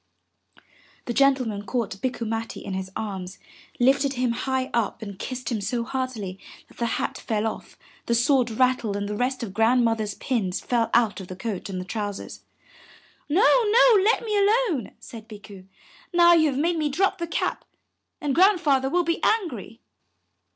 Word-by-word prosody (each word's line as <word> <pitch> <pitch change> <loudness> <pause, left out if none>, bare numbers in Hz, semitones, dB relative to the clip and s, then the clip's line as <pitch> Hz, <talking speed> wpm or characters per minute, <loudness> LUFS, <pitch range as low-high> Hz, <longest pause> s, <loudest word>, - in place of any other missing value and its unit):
'' - - -30
The 240 - -3
gentleman 255 -6 +2
caught 215 -4 -3
Bikku 245 -2 -2
Matti 225 +1 -4
in 195 - -4
his 190 0 -4
arms, 190 -3 -5 0.4
lifted 270 +2 +3
him 250 -2 0
high 260 +2 -2
up 230 -1 -1
and 200 -2 -8
kissed 255 0 -5
him 220 -3 -1
so 235 +4 -2
heartily 235 -7 -4 0.3
that - - -20
the 235 - -1
hat - - -3
fell 215 -1 -2
off, 220 - -5 0.3
the 235 - +2
sword 250 0 +3
rattled 240 -2 +1
and 205 0 -3
the 210 - -3
rest 250 +3 -1
of 200 -5 -6
Grandmother's 225 -1 +2
pins 210 -8 -2
fell 235 -2 0
out 230 -4 +2
of 185 - -9
the 185 - -7
coat 200 -1 -5
and 185 -1 -4
the 180 - -6
trousers. 205 0 -5 0.9
'*No, 355 +9 +3 0.2
no, 445 -1 +6
let 450 +3 +2
me 425 -1 -1
alone," 400 - +1
said 225 -2 -11
Bikku. 205 -3 -12 0.4
'*Now 345 -1 +6
you 315 -2 +4
have 265 - -3
made 335 +4 +1
me 300 -1 0
drop 375 +6 0
the 340 - -3
cap, 330 - -2 0.6
and 290 -2 -1
Grandfather 315 -7 +3
will 350 +4 +2
be 335 0 -1
angry." 275 - -1
245 Hz, 175 wpm, -24 LUFS, 210-285 Hz, 0.9 s, no